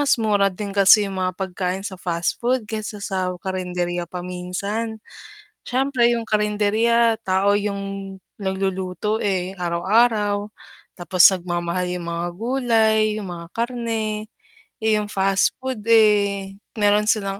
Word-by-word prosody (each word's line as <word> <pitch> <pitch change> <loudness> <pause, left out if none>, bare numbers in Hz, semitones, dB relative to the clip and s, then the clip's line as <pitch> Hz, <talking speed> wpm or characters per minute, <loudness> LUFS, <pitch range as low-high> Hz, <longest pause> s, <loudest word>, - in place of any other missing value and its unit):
mas 285 -2 +3
mura 205 -3 +3
din 200 +1 -6
kasi 200 +2 +7
yung 190 -1 -4
mga 185 0 0
pagkain 190 0 -3
sa 190 -2 -5
fast 170 -2 -2
food 245 -1 0
kaysa 215 -1 -5
sa 185 -2 -1
karenderya 180 -2 -3
pa 180 +1 -6
minsan. 200 +5 -4 0.7
Siyempre 255 -2 +2
yung 230 -1 -2
karenderya, 220 +2 +2
tao 195 +2 +2
yung 195 -1 -4 0.2
nagluluto 190 +2 -2
eh, 190 -2 -1
araw-araw. 205 +4 +1 0.5
Tapos 180 0 +2
nagmamahal 175 -1 -2
yung 170 -1 -7
mga 170 +1 -2
gulay, 225 0 +2 0.2
yung 195 - -7
mga 170 -1 -9
karne. 230 -3 -2 0.6
Eh, 220 -1 +3
yung 210 - -3
fast 195 -1 +1
food 260 -3 -3
eh, 205 -3 +3 0.2
meron 210 0 +3
silang 195 -3 0
200 Hz, 130 wpm, -22 LUFS, 185-220 Hz, 0.7 s, kasi